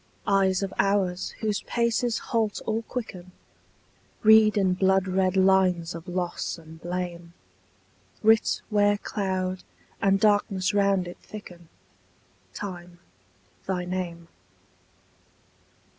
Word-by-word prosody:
Eyes 195 -1 +2
of 195 - -4
hours 190 -2 0
whose 215 -2 -1
paces 235 0 0
halt 220 -3 -1
or 220 +1 -1
quicken 185 -7 -7 0.9
Read 220 -1 +6
in 190 -2 +3
bloodred 190 0 +2
lines 185 -3 +3
of 165 +2 -9
loss 180 -1 -3
and 160 0 -14
blame, 175 -1 -5 0.9
Writ 220 0 +3
where 205 0 +3
cloud 185 -3 -3 0.4
and 195 0 +3
darkness 200 -2 +2
round 200 -3 +2
it 175 - -9
thicken, 175 -6 -11 0.9
Time, 175 -3 -7 0.7
thy 180 -2 -1
name. 175 -2 -4
190 Hz, 100 wpm, -26 LUFS, 180-205 Hz, 0.9 s, Read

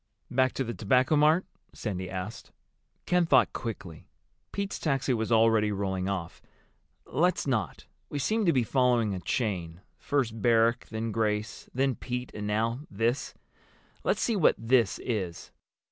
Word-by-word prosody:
"Back 130 0 +2
to 135 - -1
the 120 -1 -4
Tobacco 125 +8 +2
Mart?" 155 +4 +4 0.3
Sandy 95 -4 -4
asked. 95 +4 -6 0.5
Ken 180 -1 +2
thought 130 -5 +4
quickly. 95 -8 -6 0.4
Pete's 200 -1 -3
taxi 135 -4 0
was 110 -1 -2
already 110 -2 +4
rolling 95 -1 -2
off. 90 -3 -4 0.6
"Let's 180 +4 +1
not. 120 -7 -2 0.2
We - - -4
seem 215 - +1
to - - +6
be 130 -5 +2
following 120 -4 +2
a 95 - -3
chain—first 105 - -2
Barrack, 115 +2 +3
then 110 0 -3
Grace, 105 -1 -2
then 135 +1 +1
Pete—and 125 -4 -5
now 115 +3 0
this. 120 +4 -1 0.7
Let's - - +1
see 230 - +1
what 185 - +4
'this' 115 -2 +2
is." 95 -8 -3
115 Hz, 140 wpm, -28 LUFS, 105-130 Hz, 0.7 s, to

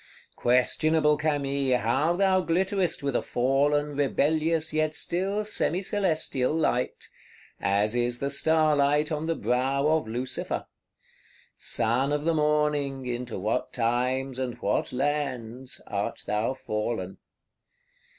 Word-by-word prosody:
Questionable 150 +5 +3
Camille, 140 -3 0
how 140 +9 +1
thou 190 0 +3
glitterest 185 0 0
with 140 -3 -1
a - - +2
fallen, 145 +3 +1
rebellious, 155 +3 +1
yet 155 0 0
still 195 +4 -1
semi 195 -3 +1
celestial 160 -9 0
light; 125 -6 -1 0.5
as 100 +2 +1
is 120 0 0
the 140 +2 -2
star 155 +1 +3
light 145 +2 +2
on 155 +1 -2
the 165 - 0
brow 135 +2 0
of 160 -5 +1
Lucifer! 125 +3 -3 0.9
Son 125 +6 0
of 150 0 0
the 165 - +2
Morning, 150 -3 +1
into 120 -1 -4
what 110 +6 -1
times 125 +2 0
and 125 -2 -3
what 100 - -1
lands, 130 -3 -3
art - - -3
thou 110 +5 -1
fallen! 105 -5 -4
140 Hz, 120 wpm, -27 LUFS, 125-155 Hz, 0.9 s, Questionable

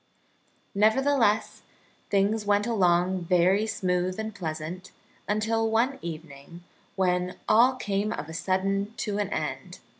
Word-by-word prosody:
Nevertheless, 220 +1 +2 0.5
things 205 +2 +1
went 205 0 +2
along 185 -4 +2
very 185 +4 +3
smooth 180 -2 -1
and 220 0 -4
pleasant, 165 +1 -6 0.4
until 220 +2 +1
one 245 +5 +1
evening, 160 0 -9 0.3
when 180 -1 0
all 240 +4 +5
came 205 -3 -2
of 150 - -5
a 160 - -8
sudden 195 +4 -1
to 205 -2 -2
an 205 -1 -1
end. - - -4
200 Hz, 120 wpm, -27 LUFS, 180-220 Hz, 0.5 s, all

